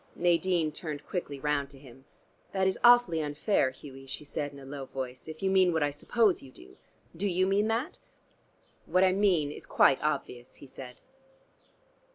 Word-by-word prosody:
Nadine 170 -2 +1
turned 150 -2 -7
quickly 145 -6 -4
round 145 -1 -1
to 140 - -12
him. 135 -1 -16 0.5
"That 190 -1 +1
is 190 - 0
awfully 240 -9 +6
unfair, 150 +1 +1
Hughie," 135 0 -12
she 135 - -7
said 145 0 -4
in 140 - -13
a 135 - -11
low 135 0 -7
voice, 130 0 -7
"if 160 +3 -9
you 190 - +2
mean 190 -2 +4
what 160 -2 +1
I 145 - 0
suppose 205 +7 +1
you 135 - -13
do. 65 - -16 0.4
Do 195 +5 -1
you 185 0 +1
mean 200 +2 +2
that?" 230 +6 -2 0.9
"What 185 +1 +3
I 185 - +5
mean 185 -7 +2
is - - -10
quite 135 - +4
obvious," 135 -5 -3
he - - -13
said. 130 -2 -10
155 Hz, 185 wpm, -29 LUFS, 140-190 Hz, 0.9 s, awfully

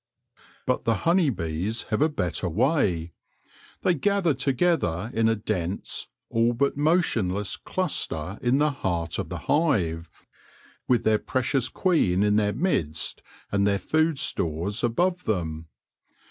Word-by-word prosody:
But 130 - 0
the 115 - +3
honey 170 -2 +4
bees 90 +2 -2
have 110 - +1
a 155 - +4
better 90 - -2
way: 85 - +1 0.7
they 180 - +3
gather 185 +1 +1
together 130 - 0
in 115 0 +3
a 115 - +2
dense, 100 -4 -3 0.2
all 115 +1 +2
but 140 +4 +1
motionless 120 - +1
cluster 100 - -2
in 125 +2 +2
the 150 +1 +3
heart 85 - -2
of - - -4
the - - -4
hive, 90 - +1 0.8
with 125 -3 +3
their 110 -1 +3
precious 130 +1 0
queen 115 - +2
in 105 0 +3
their 105 -1 +2
midst 85 - -1 0.3
and 100 0 +2
their 100 -1 +2
food 155 +6 +1
stores 90 - -2
above 175 +10 +1
them. 80 -6 -2
115 Hz, 135 wpm, -26 LUFS, 90-145 Hz, 0.8 s, honey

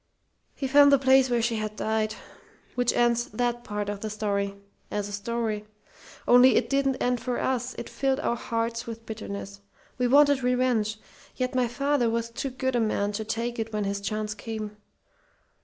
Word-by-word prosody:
He 275 - -4
found 285 +1 +7
the 280 - +7
place 265 0 +4
where 240 -2 +1
she 230 -1 0
had 215 0 -3
died.... 220 0 -1 0.6
Which 245 -1 +2
ends 240 0 +2
that 240 +2 -2
part 210 -2 -3
of 205 -1 -3
the 215 - -4
story, 200 -2 -1 0.3
as 205 -1 -2
a - - -8
story. 215 0 -3 0.6
"Only 250 +1 +7
it - - +1
didn't 275 -1 +2
end 250 -1 0
it - - -14
for 250 -1 -2
us. 255 -1 -1
It - - -6
filled 270 0 0
our 235 - 0
hearts 230 0 -3
with 230 0 -7
bitterness. 200 -2 -7 0.4
We 250 - +3
wanted 285 +1 +5
revenge. 250 -4 +1 0.4
Yet 255 0 -2
my 255 -1 +2
father 275 0 +1
was 230 0 -2
too 270 +4 -3
good 260 0 -2
a - - +3
man 210 -2 0
to 215 +1 -3
take 230 +2 -3
it 225 0 -3
when 210 -1 -1
his 200 0 -2
chance 210 +1 -2
came. 215 0 -6
230 Hz, 190 wpm, -27 LUFS, 215-250 Hz, 0.6 s, found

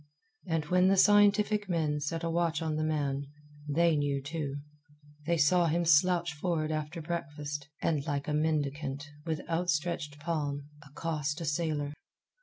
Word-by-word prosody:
And 165 -3 0
when 180 +3 +3
the 195 +1 +4
scientific 205 0 +4
men 155 -4 0
set 165 +3 -3
a 165 - 0
watch 165 -1 0
on 155 -1 -1
the 155 - 0
man, 145 -3 -1 0.4
they 165 +2 +3
knew 145 -1 0
too. 145 0 -4 0.7
They 170 0 +2
saw 170 +3 +4
him 170 +2 +1
slouch 170 +1 +4
for'ard 155 0 -1
after 155 +2 -3
breakfast, 150 -3 -4 0.2
and, 150 -4 +1
like 145 -2 -2
a 150 - -1
mendicant, 145 -2 -1 0.2
with 160 -2 -3
outstretched 165 -3 -1
palm, 145 -3 -3
accost 150 +1 -3
a 165 - -4
sailor. 150 -1 -1
155 Hz, 150 wpm, -30 LUFS, 145-170 Hz, 0.7 s, the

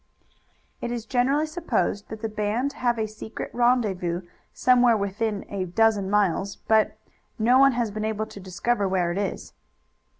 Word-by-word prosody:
"It 240 - -3
is 235 -2 -4
generally 270 +5 +2
supposed 285 - -2
that 220 +1 -8
the - - +1
band 215 +6 -1
have 240 -4 0
a 220 -1 -1
secret 215 +1 -7
rendezvous 205 -8 +1 0.3
somewhere 245 -2 +4
within 205 +1 -2
a 195 -2 -3
dozen 205 +1 +2
miles, 200 -1 +1
but 220 -1 +1 0.4
no 245 +3 +4
one 275 0 +6
has 235 -3 -1
been 215 +1 -4
able 220 0 -1
to 205 - -11
discover 200 +3 -1
where 180 -2 +1
it 180 - -2
is." 200 - -4
220 Hz, 160 wpm, -25 LUFS, 200-240 Hz, 0.4 s, one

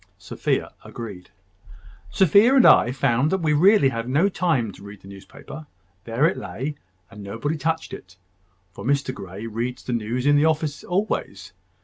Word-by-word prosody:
Sophia - - -3
agreed. 100 -6 -9 0.8
"Sophia 200 - +4
and 260 - +6
I 125 - +6
found 135 +1 +1
that 190 - +2
we 160 -4 0
really 180 -1 +5
had 115 -1 -5
no 155 +10 +2
time 160 - 0
to - - -16
read 100 -1 -11
the - - -15
newspaper. 100 +9 -11 0.4
There 115 +5 +1
it 170 - +1
lay, 110 +10 -5 0.4
and 105 -2 -11
nobody 115 +10 -4
touched 160 +2 -3
it; 90 +1 -11 0.5
for 100 - -10
Mr 140 +1 0
Grey 95 0 -9
reads 115 +3 -4
the 125 - -4
news 120 +3 -2
in 145 0 +4
the 145 - +3
office 155 -2 -1
always. 195 +4 -3
130 Hz, 165 wpm, -23 LUFS, 115-160 Hz, 0.8 s, and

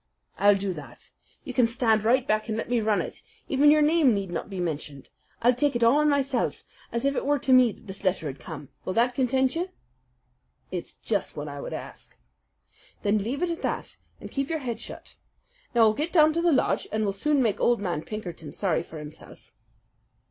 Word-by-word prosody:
"I'll 205 0 +6
do 195 -1 -2
that. 150 -4 -11 0.3
You 260 - -6
can 245 -1 +4
stand 230 -2 +2
right 250 +4 +3
back 215 +1 +1
and 220 - -1
let 230 - -4
me 240 -2 +2
run 215 -1 +2
it. - - -9 0.3
Even 285 +2 +4
your 305 0 +6
name 300 -6 +4
need 195 -3 -3
not 175 - -4
be 190 -2 -5
mentioned. 150 -5 -4 0.3
I'll 245 +2 +6
take 275 +2 +1
it 240 - +1
all 230 +5 +5
on 300 0 +3
myself, 275 -3 0 0.3
as 235 +2 -2
if 275 0 +2
it - - -1
were 290 +1 +2
to 265 -1 +2
me 255 -2 +6
that - - -16
this 195 -1 -8
letter 185 -4 0
has 135 - -15
come. 135 +3 -8
Will 185 - -3
that 240 +3 +2
content 260 +1 +1
you?" 350 +3 -2 1.0
"It's 180 -2 -5
just 205 -7 -3
what 145 0 -4
I 145 -1 -6
would - - -6
ask." - - -9 0.9
"Then 210 +1 +2
leave 250 - -2
it 350 - +1
at 335 - -4
that - - -3 0.2
and - - -9
keep 275 0 -2
your 325 - 0
head 245 -6 -4
shut. - - -11 0.6
Now 235 - +5
I'll 220 -1 +6
get 305 +8 -2
down 310 -3 +5
to 335 - 0
the 345 0 +3
lodge, 270 - +1
and 215 0 0
we'll 200 -2 0
soon 285 +6 +1
make 220 -4 0
old 240 -1 +3
man 175 -6 -2
Pinkerton 175 -6 -7
sorry 180 -5 0
for 165 -1 -10
himself." 150 0 -11
230 Hz, 220 wpm, -26 LUFS, 195-275 Hz, 1.0 s, I'll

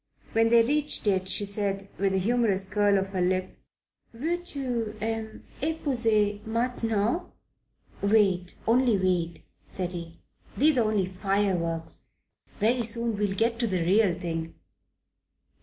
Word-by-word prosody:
When 225 0 +3
they 230 0 +6
reached 295 +3 +1
it 190 -2 +1
she 205 +2 +1
said, 200 -1 0
with 195 0 +2
a 190 - +1
humorous 200 -2 +1
curl 205 0 +2
of 195 0 -2
the 185 -2 -1
lip, 185 +1 0 0.6
"Veux 335 +8 -2
tu 245 -9 -3
m'epouser 225 -1 -1
maintenant?" 230 - -1 0.7
"Wait, 195 -4 +2
only 240 -1 +3
wait," 180 -3 -1 0.2
said 180 -1 -3
he. 170 -1 -7 0.4
"These 295 -1 +4
are 220 -2 +2
only 205 -3 +1
fireworks. 185 -4 -2 0.5
Very 235 +4 +2
soon 230 0 -1
we'll 205 -1 -1
get 230 +2 0
to 235 - +1
the 185 -4 0
real 190 +1 +3
thing." 165 -2 -5
210 Hz, 130 wpm, -27 LUFS, 190-230 Hz, 0.7 s, they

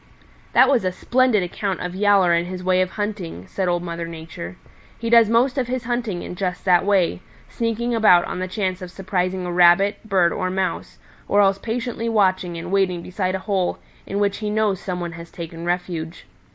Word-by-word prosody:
"That - - +6
was 260 -6 +3
a 185 - 0
splendid 245 +1 +2
account 185 +1 -3
of 180 0 -4
Yowler 195 -2 +4
and 170 +1 +1
his 185 0 -6
way 185 0 +3
of 185 - 0
hunting," 200 - -4
said 190 - -3
Old 175 0 0
Mother 170 -1 -4
Nature. 160 - -8 0.4
"He 230 0 -4
does 230 -2 +6
most 250 +4 +2
of 250 - -1
his 255 0 -3
hunting 235 -6 -2
in - - -6
just 180 0 -3
that 180 -2 +4
way, 190 -3 +1 0.3
sneaking 235 +1 -2
about 215 -6 +5
on - - -5
the 185 - -2
chance 185 -1 -2
of 180 - -7
surprising 185 -1 -2
a 175 - -3
Rabbit, 180 +4 +4
Bird 180 -4 +3
or 185 -2 -2
Mouse, 185 0 -3 0.3
or 205 - +2
else 195 -1 +4
patiently 230 +1 -3
watching 185 -5 +1
and 175 +2 -6
waiting 185 -3 +1
beside 185 0 -2
a 190 - -6
hole 190 -4 0 0.3
in 195 - -3
which 200 -1 +1
he 210 -1 -3
knows 210 -3 +1
some 180 -2 -4
one 175 -1 -4
has 165 0 -10
taken 165 0 -8
refuge. 175 -2 -3
185 Hz, 205 wpm, -22 LUFS, 175-210 Hz, 0.4 s, That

